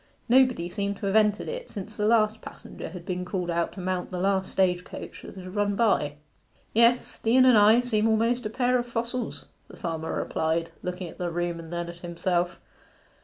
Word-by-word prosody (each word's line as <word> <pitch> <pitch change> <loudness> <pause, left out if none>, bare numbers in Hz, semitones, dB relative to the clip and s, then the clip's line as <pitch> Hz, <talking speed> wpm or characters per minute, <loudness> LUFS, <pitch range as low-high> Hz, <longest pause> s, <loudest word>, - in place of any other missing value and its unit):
Nobody 250 -8 +4
seemed 200 +2 -3
to 205 - -5
have 195 +1 0
entered 210 -1 +3
it - - -5
since 210 0 -7
the 210 0 0
last 220 -1 +3
passenger - - -9
had 175 0 -9
been 180 -2 -3
called 180 -1 -2
out 170 0 -1
to - - -9
mount 185 0 -2
the 180 - -5
last 190 +1 0
stage 180 -2 +2
coach - - -9
that - - -11
had 185 -1 -9
run 205 -1 +1
by. 195 -9 +2 0.6
'Yes, 235 +2 +3
the 225 +3 +2
Inn 255 - +7
and 255 -2 +7
I 215 +3 +6
seem 225 -3 +1
almost 230 +1 +2
a - - -6
pair 250 +2 +2
of 240 - -4
fossils,' 235 +1 -3 0.2
the - - -13
farmer 160 -1 -3
replied, 165 +1 -1
looking 180 0 -4
at - - -12
the 175 -1 -1
room 175 0 -2
and 165 0 -10
then 175 0 -3
at 170 0 -8
himself. 175 0 -1
195 Hz, 210 wpm, -27 LUFS, 175-225 Hz, 0.6 s, Inn